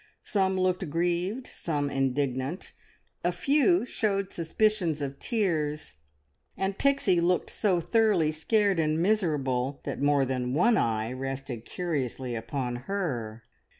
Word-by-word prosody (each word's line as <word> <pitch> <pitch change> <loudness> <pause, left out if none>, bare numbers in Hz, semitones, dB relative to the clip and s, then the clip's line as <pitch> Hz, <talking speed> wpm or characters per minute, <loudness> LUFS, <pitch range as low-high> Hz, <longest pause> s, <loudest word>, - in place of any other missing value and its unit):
Some 190 -2 +1
looked 185 -2 0
grieved, 175 - -1
some 145 -4 -3
indignant, 135 +3 -1 0.5
a - - +2
few 300 +2 +3
showed 200 -5 -1
suspicions 175 -1 +1
of 140 -1 -4
tears, 155 - -1 0.6
and 195 0 -1
Pixie 275 -11 +3
looked 180 +1 +1
so 190 -5 +1
thoroughly 195 -4 +2
scared 200 +4 +1
and 155 0 +1
miserable 145 -9 0
that - - -4
more 145 -1 +3
than 125 0 -2
one 230 +9 +4
eye 115 - 0
rested 135 -3 -5
curiously 135 -7 -3
upon 120 +1 -3
her. 120 - -3
160 Hz, 120 wpm, -28 LUFS, 135-195 Hz, 0.6 s, one